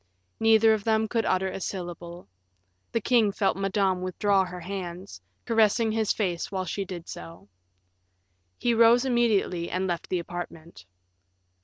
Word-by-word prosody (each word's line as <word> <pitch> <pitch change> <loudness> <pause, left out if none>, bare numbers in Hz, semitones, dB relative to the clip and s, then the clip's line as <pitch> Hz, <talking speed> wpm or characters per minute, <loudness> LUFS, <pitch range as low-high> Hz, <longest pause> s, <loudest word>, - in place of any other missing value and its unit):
Neither 225 0 +5
of 215 -2 -2
them 220 0 +1
could 225 0 -1
utter 185 +1 +1
a 190 - -5
syllable. 175 -2 -6 0.6
The 230 - 0
king 225 -3 +3
felt 195 -1 0
Madame 195 -1 0
withdraw 190 +2 +1
her 180 -1 -7
hands, 180 - -7 0.2
caressing 225 0 +3
his 220 -1 0
face 180 -5 -2
while 190 -1 -2
she 200 - -3
did 175 -2 -8
so. 85 +4 -10 1.1
He 240 - +1
rose 230 +2 +5
immediately 220 -8 +1
and 185 +1 -1
left 175 -2 -3
the 185 - 0
apartment. 170 - -8
195 Hz, 145 wpm, -26 LUFS, 175-220 Hz, 1.1 s, Neither